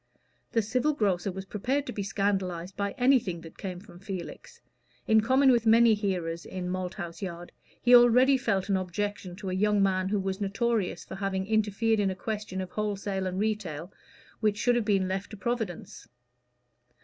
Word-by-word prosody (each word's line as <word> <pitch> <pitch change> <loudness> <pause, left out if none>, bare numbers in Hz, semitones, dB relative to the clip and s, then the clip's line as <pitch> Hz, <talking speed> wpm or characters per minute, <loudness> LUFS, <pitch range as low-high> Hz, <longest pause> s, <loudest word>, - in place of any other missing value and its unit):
The 225 -2 +2
civil 255 +8 +1
grocer 195 -6 0
was 190 +1 -7
prepared 255 +9 -1
to - - -5
be 205 - -3
scandalized 195 -3 -2
by 200 +2 -2
anything 245 -10 +2
that 165 - -13
came 185 -3 -5
from 180 -3 -14
Felix. 195 - -8 0.5
In 220 0 +5
common 260 +4 +4
with 235 -2 +2
many 230 0 +6
hearers 180 -5 -2
in 180 -1 -5
Malthouse 180 -1 -5
Yard, 175 -2 -6 0.3
he 245 0 +6
already 245 +3 +6
felt 220 -7 0
an 195 -2 +2
objection 185 0 -3
to 190 -1 -5
a - - -2
young 205 +1 +2
man 190 -1 +1
who 205 0 +1
was 190 +1 -3
notorious 200 -3 -1
for - - -9
having 190 -1 -2
interfered 220 +1 +1
in 200 -1 +2
a 190 - -3
question 210 -2 -4
of 185 -1 -6
wholesale 200 -2 -2
and 185 0 -3
retail, 195 -6 -3 0.5
which 215 -2 +1
should 245 +3 +2
have 240 -3 0
been 195 -3 +2
left 190 +1 -3
to 215 - -9
Providence. 225 -5 -4
200 Hz, 180 wpm, -28 LUFS, 185-220 Hz, 0.5 s, many